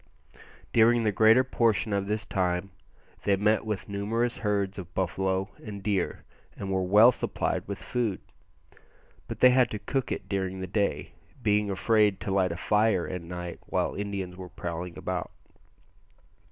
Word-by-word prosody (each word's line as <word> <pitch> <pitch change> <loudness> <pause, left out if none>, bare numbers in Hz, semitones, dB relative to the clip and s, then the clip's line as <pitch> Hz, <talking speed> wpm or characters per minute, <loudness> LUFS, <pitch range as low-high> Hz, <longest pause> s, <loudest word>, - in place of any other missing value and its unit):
During 115 +1 +5
the 105 - +2
greater 110 +5 +5
portion 115 -4 +1
of 100 0 0
this 105 0 -2
time 90 0 -1 0.5
they 100 - +2
met 105 +2 +1
with 105 -3 -3
numerous 115 +4 -1
herds 100 -2 -1
of 85 -2 -10
buffalo 95 +1 -1
and 100 -3 -7
deer, 100 -4 -1 0.3
and 95 -1 -4
were 95 0 +1
well 105 +6 +7
supplied - - -2
with - - -4
food; 115 -6 -2 1.1
but - - -7
they 125 - +8
had 125 -2 +4
to 105 - -4
cook 125 +5 -2
it - - -4
during 95 -1 -2
the 95 - -3
day, 90 -5 -1 0.3
being 105 -1 +2
afraid 105 0 +2
to 100 - -3
light 95 -2 +2
a 85 - -4
fire 105 -2 +2
at 90 -1 -4
night 90 0 -7
while - - 0
Indians 100 -3 -4
were 90 -1 -9
prowling 85 0 -6
about. - - -3
100 Hz, 160 wpm, -28 LUFS, 95-110 Hz, 1.1 s, they